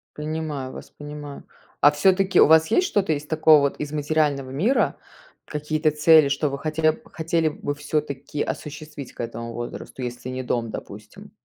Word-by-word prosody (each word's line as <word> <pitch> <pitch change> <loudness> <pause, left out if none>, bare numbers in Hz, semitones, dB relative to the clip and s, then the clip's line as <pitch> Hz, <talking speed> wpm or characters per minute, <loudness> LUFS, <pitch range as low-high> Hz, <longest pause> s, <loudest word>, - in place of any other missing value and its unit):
Понимаю 150 -3 -4
вас, - - -11
понимаю. 145 -1 -9 0.4
А 145 - +7
всё-таки 190 +4 +3
у - - +8
вас 160 +1 +6
есть 360 - +2
что-то 195 - +1
из 150 0 -4
такого 155 -1 +5
вот 140 -1 0
из 150 0 -4
материального 145 -3 0
мира? 200 - +1 0.5
Какие-то 155 +1 -1
цели, 155 -1 +5
что 145 +1 0
вы 140 - -4
хотели 155 +1 +1
бы 235 +3 -15
хотели 165 -1 0
бы 145 -1 -4
всё-таки 145 -1 -3
осуществить 150 -2 -7
к - - -24
этому 115 0 -5
возрасту, 120 +2 -7
если 125 +1 -5
не 130 0 -4
дом, 120 -2 -1
допустим? - - -10
150 Hz, 170 wpm, -23 LUFS, 140-160 Hz, 0.5 s, у